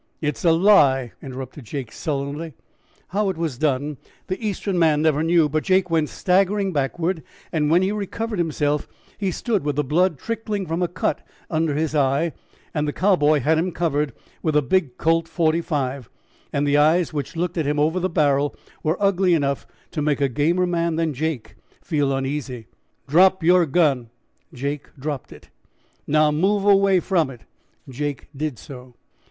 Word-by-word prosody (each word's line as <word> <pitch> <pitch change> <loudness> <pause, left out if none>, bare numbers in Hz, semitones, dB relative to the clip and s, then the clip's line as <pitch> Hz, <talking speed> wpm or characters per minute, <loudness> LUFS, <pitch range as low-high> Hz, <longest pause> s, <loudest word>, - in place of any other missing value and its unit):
"It's 150 -3 -3
a 170 - +5
lie!" 150 - +4
interrupted 130 0 -8
Jake 125 -1 -5
sullenly. 145 +1 -4 0.5
How 200 +1 0
it 185 - -3
was 160 -7 -3
done 145 -1 0 0.3
the 185 +4 -4
Eastern 200 -3 -1
man 155 -2 +3
never 155 -2 +2
knew, 165 -1 +3
but 155 +1 -1
Jake 185 -2 +2
went 160 -2 +1
staggering 195 +1 +1
backward, 160 +5 -1 0.3
and 150 -2 +1
when 175 +4 +4
he 190 - +1
recovered 210 +1 -3
himself 150 -3 0 0.3
and 195 -2 0
stood 215 - -1
with 145 -1 -1
the 150 - +1
blood 165 +4 +2
trickling 215 -2 -3
from 165 +1 -2
a 175 - +2
cut 175 0 -2 0.3
under 160 -2 0
his 155 0 -1
eye, 145 +3 +1 0.4
the 150 -1 0
Cowboy 155 -5 +3
had 160 +5 +2
him 180 +2 -1
covered 150 -5 -1 0.3
with 155 -2 0
a 150 - +4
big 135 -2 0
Colt's 165 0 +1
45, 155 -6 -1 0.4
and 140 +1 0
the 145 +1 +3
eyes 160 +3 +3
which 150 +3 -4
looked 175 +1 -2
at 155 - 0
him 150 0 0
over 155 +5 +2
the 185 +1 -1
barrel 145 -3 +1 0.3
were 160 +3 0
ugly 190 -3 +3
enough 140 -3 -1 0.2
to 155 - -3
make 150 -1 +1
a 140 - +3
gamer 160 +8 +1
man 170 -2 0
than 160 -2 0
Jake 150 -3 -3 0.3
feel 145 -3 0
uneasy. 135 -3 -3 0.4
"Drop 185 +4 +4
yer 175 0 +5
gun." 140 -6 +2 0.4
Jake 140 +3 -4
dropped 140 -1 -5
it. - - -15 0.6
"Now 155 0 +3
move 195 +6 +1
away 195 -2 +5
from 170 -7 +1
it." 125 -4 -11 0.5
Jake 140 +1 -4
did 150 -3 -3
so. 125 -1 -11
155 Hz, 170 wpm, -22 LUFS, 145-180 Hz, 0.6 s, a